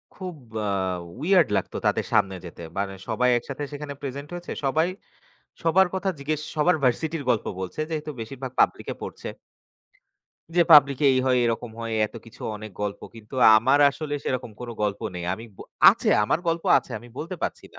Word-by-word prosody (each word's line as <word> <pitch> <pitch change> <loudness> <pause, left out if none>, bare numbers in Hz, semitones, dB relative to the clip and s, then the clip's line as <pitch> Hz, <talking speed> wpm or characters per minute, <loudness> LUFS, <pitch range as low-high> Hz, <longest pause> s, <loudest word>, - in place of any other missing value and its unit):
খুব 185 -4 -6 0.3
আ - - 0 0.5
weird 180 0 +4
লাগতো - - -3
তাদের - - +1
সামনে 95 -1 +3
যেতে। 85 - -10 0.2
মানে 100 -1 -1 0.2
সবাই 125 +3 +2
একসাথে 135 +4 -5
সেখানে 145 0 -6
প্রেজেন্ট 140 +1 -5
হয়েছে। 175 0 -6
সবাই 160 +5 +2 0.8
সবার 180 +3 +4
কথা 190 +1 -1
জিজ্ঞেস 155 +2 -2
সবার 155 +4 +3
ভার্সিটির 150 +5 0
গল্প 115 - +2
বলছে, 95 +10 -6
যেহেতু 155 -1 -3
বেশিরভাগ 130 +2 -6
পাবলিকে - - +2
পড়ছে। - - -6 1.3
যে 175 - +7
পাবলিকে 140 -1 +7
"এই 130 - +2
হয়, 125 -1 +3
এরকম 115 0 -1
হয়" 115 -1 -3
এতকিছু 115 0 -13 0.2
অনেক 110 0 -9
গল্প। 100 0 -3
কিন্তু 110 +2 -12 0.2
আমার 130 +6 +4
আসলে 145 0 -5
সেরকম 125 -3 -2
কোনো 120 -1 -6
গল্প 100 -1 -1
নেই। 85 -1 -5
আমি 115 - -10
ব - - -33 0.3
আছে - - -2 0.2
আমার 150 - +1
গল্প 165 0 -1
আছে, - - -12
আমি 120 +2 -14
বলতে 175 +3 -5
পারছি - - -3
না। - - -12
135 Hz, 170 wpm, -25 LUFS, 115-155 Hz, 1.3 s, যে